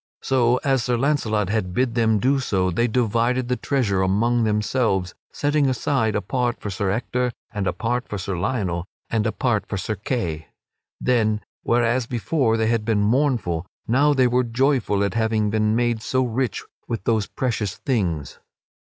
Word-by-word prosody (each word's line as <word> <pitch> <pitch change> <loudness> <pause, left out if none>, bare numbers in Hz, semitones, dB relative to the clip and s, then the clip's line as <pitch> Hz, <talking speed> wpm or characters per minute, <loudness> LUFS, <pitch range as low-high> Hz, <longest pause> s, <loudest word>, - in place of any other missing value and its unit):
So, 125 -2 +3
as 135 -3 +2
Sir 120 -1 0
Launcelot 115 -7 +1
had 90 -4 -1
bid 125 -2 +1
them 110 -2 +2
do 135 +6 +2
so, 95 -7 0
they 120 +8 +1
divided 120 +2 +1
the 125 - +2
treasure 115 -9 0
among 115 +5 +2
themselves, 105 -3 0 0.2
setting 145 -1 +1
aside 125 -3 0
a 105 - -1
part 125 -2 -1
for 105 - -5
Sir 95 +1 -1
Ector 125 +4 -1 0.2
and 100 -2 -2
a - - +2
part 120 +2 -2
for 105 - -4
Sir 95 0 -3
Lionel 90 -3 -2 0.2
and 110 -1 +1
a - - 0
part 110 -4 0
for 100 - -3
Sir 110 +3 -2
Kay. 90 - -3 0.5
Then, 110 -4 +1 0.2
whereas 120 +1 +1
before 120 -1 0
they 110 - +1
had 115 -1 +1
been 105 -2 +1
mournful, 110 - +1 0.2
now 140 +6 +4
they 130 -1 +4
were 125 +1 +2
joyful 120 -4 +1
at 100 - -1
having 110 -2 +1
been 110 0 +1
made 120 -1 +1
so 130 +3 0
rich 120 -2 -2 0.2
with 115 -5 -3
those 110 -3 +1
precious 110 -6 -2
things. 90 - -2
115 Hz, 175 wpm, -23 LUFS, 105-125 Hz, 0.5 s, now